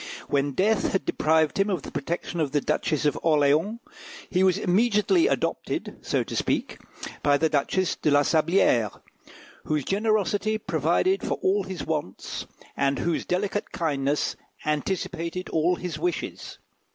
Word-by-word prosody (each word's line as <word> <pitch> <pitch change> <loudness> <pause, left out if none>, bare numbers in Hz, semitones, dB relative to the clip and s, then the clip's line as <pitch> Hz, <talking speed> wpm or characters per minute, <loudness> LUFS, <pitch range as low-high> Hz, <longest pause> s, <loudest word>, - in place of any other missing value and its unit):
When 140 0 +1
death 210 +6 +1
had 190 - 0
deprived 160 +2 +2
him 195 +1 +2
of 180 -7 -1
the - - -8
protection 170 +3 -3
of 150 -3 -1
the 145 - +3
Duchess 150 +1 -1
of 150 - +1
Orleans, 155 +7 +2 0.5
he 185 0 +3
was 185 -2 +4
immediately 225 - +3
adopted, - - -2
so - - 0
to - - -7
speak, - - -1 0.4
by 145 -1 +4
the 160 +2 +2
Duchess 160 +5 0
de - - 0
la 145 0 +5
Sablière, 155 - +2 0.7
whose 150 -3 -1
generosity 215 +1 +1
provided 375 - +1
for - - -1
all 395 +1 +2
his 185 -5 -5
wants, 150 - -4 0.3
and 140 0 +1
whose 170 -1 -1
delicate 200 +3 -1
kindness 145 -3 0 0.3
anticipated 175 +3 -2
all 165 +3 +2
his 175 -4 -5
wishes. 175 0 -3
170 Hz, 145 wpm, -26 LUFS, 150-195 Hz, 0.7 s, la